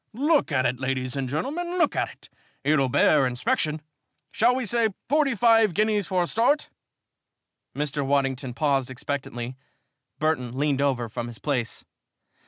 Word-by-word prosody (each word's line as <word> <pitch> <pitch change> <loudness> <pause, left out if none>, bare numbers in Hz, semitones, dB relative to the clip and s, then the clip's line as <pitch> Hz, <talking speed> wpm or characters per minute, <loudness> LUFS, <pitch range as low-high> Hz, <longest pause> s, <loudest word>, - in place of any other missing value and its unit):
Look 290 - +2
at 130 -3 +1
it, 125 +1 0
ladies 130 0 -2
and 135 -2 -2
gentlemen. 325 - -3
Look 340 -4 +2
at - - 0
it. - - -17 0.3
It'll 145 -3 +2
bear 135 +2 +4
inspection. 150 +5 -1 0.5
Shall 240 +3 +3
we 255 -1 -2
say 230 +1 +2 0.2
forty 285 -2 +2
five 225 -3 +4
guineas 210 -1 +1
for 185 -2 +1
a - - -1
start?" 245 - +1 1.1
Mr. 145 0 -2
Waddington 135 -2 0
paused 135 -3 +1
expectantly. 130 -2 -5 0.6
Burton 130 -6 -1
leaned 140 -1 +1
over 130 -4 0
from 115 +2 -5
his 120 -2 -8
place. 125 -5 -3
145 Hz, 150 wpm, -25 LUFS, -, 1.1 s, bear